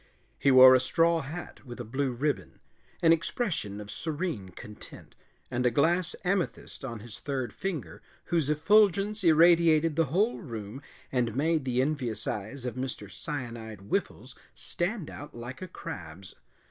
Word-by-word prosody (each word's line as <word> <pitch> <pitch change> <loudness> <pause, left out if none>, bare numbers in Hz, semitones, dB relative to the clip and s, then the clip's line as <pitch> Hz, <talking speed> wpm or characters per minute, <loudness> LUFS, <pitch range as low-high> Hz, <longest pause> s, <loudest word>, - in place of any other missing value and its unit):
He 140 - +3
wore 130 0 +10
a 130 - +6
straw 165 +5 +2
hat 160 +6 -8
with 120 -2 -9
a - - -3
blue 130 +4 -1
ribbon, 140 +5 -2 0.4
an 165 0 +7
expression 165 - -2
of 105 0 -8
serene 155 - -3
content, 105 +3 -11 0.4
and 125 0 0
a 125 - +4
glass 170 +7 +2
amethyst 185 -5 -2
on 115 -5 -5
his 115 +1 -9
third 130 -5 -3
finger 150 - -5 0.2
whose 165 -5 0
effulgence 200 +5 +3
irradiated 165 -1 +5
the 165 0 +3
whole 195 - +1
room 115 - -7 0.3
and 120 -3 0
made 155 +1 +1
the 125 0 +2
envious 125 -7 -2
eyes 115 +6 -4
of 125 - -2
Mr. 130 +1 -5
Cyanide 115 - -6
Whiffles 100 - -3 0.2
stand 175 -1 -3
out 145 +1 -9
like 120 +5 -8
a 185 - -5
crab's. 95 - -8
140 Hz, 150 wpm, -29 LUFS, 120-165 Hz, 0.4 s, wore